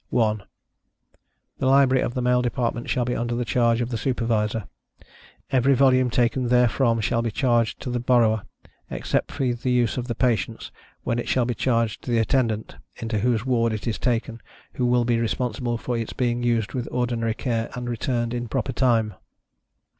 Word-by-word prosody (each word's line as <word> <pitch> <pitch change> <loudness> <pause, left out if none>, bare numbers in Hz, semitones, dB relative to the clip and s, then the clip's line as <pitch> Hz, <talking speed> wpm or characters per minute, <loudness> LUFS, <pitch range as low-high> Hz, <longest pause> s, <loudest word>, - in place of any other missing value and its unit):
1. 110 -3 +1 1.2
The 130 - 0
Library 130 -1 +5
of 120 - -2
the 125 - -1
male 125 0 +3
department 120 -1 -2
shall 125 -3 +1
be 125 - -1
under 120 0 -2
the 120 0 -1
charge 115 0 +2
of 120 - -2
the 115 -3 -3
Supervisor. 115 -4 0 0.9
Every 130 +1 +4
volume 130 -1 +4
taken 120 +1 +1
therefrom 120 -1 +3
shall 115 +2 +1
be 115 - -1
charged 120 -1 +1
to 125 - -4
the 120 - -1
borrower, 115 -3 +3 0.5
except - - -2
for 135 - -2
the 120 +2 -3
use 120 -2 +1
of 125 -1 -3
the 120 - -3
patients, 115 -3 -1 0.3
when 115 - -1
it - - -4
shall 125 -2 +2
be 120 - -1
charged 115 -2 0
to - - -8
the 120 - +2
Attendant, 115 -2 0 0.2
into 115 -2 -3
whose 115 +1 +1
ward 115 -3 +1
it 110 - -5
is 115 -3 -2
taken, 115 -2 -1 0.3
who 125 - 0
will 120 -1 +3
be 120 -1 +1
responsible 120 0 -1
for 120 +2 -3
its 115 - -4
being 120 -2 0
used 115 -4 0
with 125 -2 -3
ordinary 120 -2 -1
care 115 -2 -2
and 125 0 -5
returned 120 0 -1
in 120 0 -3
proper 130 +2 -2
time. 115 -4 +2
120 Hz, 185 wpm, -24 LUFS, 115-125 Hz, 1.2 s, Library